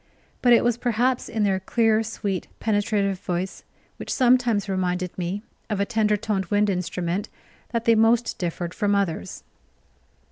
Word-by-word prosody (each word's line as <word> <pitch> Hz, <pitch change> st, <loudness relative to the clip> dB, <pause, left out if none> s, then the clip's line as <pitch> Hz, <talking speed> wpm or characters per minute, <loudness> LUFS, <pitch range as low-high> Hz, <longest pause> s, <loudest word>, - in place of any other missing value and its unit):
But 245 Hz, -, +4 dB
it 235 Hz, -, +6 dB
was 240 Hz, -1 st, +2 dB
perhaps 245 Hz, +2 st, 0 dB
in 220 Hz, -2 st, -1 dB
their 195 Hz, -2 st, +2 dB
clear, 225 Hz, +2 st, +2 dB
sweet, 205 Hz, -4 st, -3 dB
penetrative 205 Hz, -3 st, 0 dB
voice, 180 Hz, +1 st, -4 dB, 0.3 s
which -, -, -6 dB
sometimes 245 Hz, -5 st, +3 dB
reminded 180 Hz, -2 st, -1 dB
me 185 Hz, +3 st, -3 dB, 0.3 s
of 210 Hz, -2 st, -1 dB
a 200 Hz, -, +2 dB
tender 215 Hz, -1 st, +1 dB
toned 200 Hz, -2 st, -1 dB
wind 205 Hz, +1 st, +2 dB
instrument, 180 Hz, +1 st, -2 dB, 0.4 s
that 230 Hz, -1 st, -2 dB
they 230 Hz, -, +6 dB
most 225 Hz, +1 st, +2 dB
differed 175 Hz, 0 st, -3 dB
from 205 Hz, -1 st, +1 dB
others. 165 Hz, -, -2 dB
205 Hz, 150 wpm, -24 LUFS, 185-225 Hz, 0.4 s, it